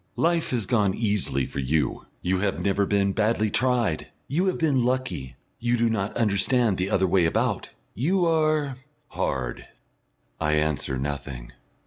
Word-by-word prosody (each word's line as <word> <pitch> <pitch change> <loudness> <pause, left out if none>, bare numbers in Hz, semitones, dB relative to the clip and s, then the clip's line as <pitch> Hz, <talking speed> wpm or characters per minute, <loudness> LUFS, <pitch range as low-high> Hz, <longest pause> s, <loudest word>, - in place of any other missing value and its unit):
Life 165 +5 +1
has 120 -5 -1
gone 105 -6 +2
easily 100 - 0
for - - -6
you; 70 +3 0 0.2
you 90 +1 +1
have 100 -3 0
never 100 +2 +1
been 100 -1 +2
badly 110 0 +1
tried. 120 -10 +1 0.2
You 175 +7 +1
have 185 - +1
been 140 -6 +2
lucky 125 - -2 0.2
you 120 +1 +1
do 115 -1 +2
not 100 -2 -2
understand 110 0 +2
the 95 +2 0
other 95 - +2
way 90 -1 +3
about. - - 0 0.2
You 175 - +1
are 155 -4 +1 0.3
hard." 60 -2 -3 0.7
I 75 -1 +1
answer 75 -3 0
nothing. 70 -3 -5
105 Hz, 150 wpm, -25 LUFS, 85-125 Hz, 0.7 s, way